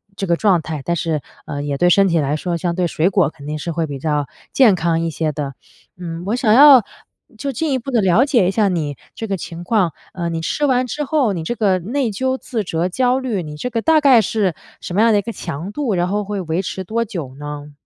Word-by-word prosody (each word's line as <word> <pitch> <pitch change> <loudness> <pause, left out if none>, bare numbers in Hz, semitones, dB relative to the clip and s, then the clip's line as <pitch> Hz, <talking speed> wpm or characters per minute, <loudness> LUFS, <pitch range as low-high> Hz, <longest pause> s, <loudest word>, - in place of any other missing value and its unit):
这 195 - -3
个 170 - +3
状 185 -2 +2
态， 155 -3 -5
但 170 - -1
是， 160 -3 -1 0.2
呃， 145 -1 -4
也 145 -1 -2
对 175 +5 +3
身 195 +2 +5
体 170 -2 +1
来 145 0 0
说 170 +2 -2
相 170 +1 -1
对 180 0 +1
水 165 +2 +1
果 185 -6 +2
肯 150 -3 -14
定 150 +1 -3
是 170 - -4
会 165 0 -1
比 140 - -5
较 150 -1 -1 0.3
健 250 -7 +6
康 165 -1 0
一 165 - -1
些 155 0 -1
的。 140 -2 -4 0.4
嗯， 170 -1 -6
我 210 +4 0
想 240 -3 +1
要 270 -1 +8 0.5
就 280 +4 -3
进 310 +5 -1
一 265 - +2
步 270 +3 -6
地 235 -3 +3
了 190 +7 +4
解 245 -9 +3
一 - - +2
下 210 0 +2
你 155 -6 -2 0.2
这 225 - -5
个 195 -2 -1
情 170 +1 -8
况， 185 -4 +1 0.2
呃， 175 -2 -3
你 165 -1 -3
吃 290 - -1
完 255 -2 +2
之 295 +6 -3
后， 270 -7 +1
你 165 -3 -4
这 240 - -2
个 195 -5 +2
内 240 +7 -1
疚 260 +5 -1
自 230 -5 -4
责 175 -1 -1
焦 250 +6 +1
虑， 240 -8 -2
你 150 -1 -8
这 250 - -4
个 230 -2 -2
大 315 +2 +4
概 270 -5 +6
是 205 -4 0 0.3
什 175 - -6
么 205 - +3
样 230 0 +5
的 205 - +4
一 - - -1
个 230 +3 -5
强 165 0 -6
度， 245 -3 -2
然 175 0 +1
后 205 +2 -1
会 200 -1 -3
维 165 +1 -1
持 190 0 -5
多 230 +5 -1
久 165 - -6
呢？ 145 0 -7
185 Hz, 280 characters per minute, -19 LUFS, 165-230 Hz, 0.5 s, 要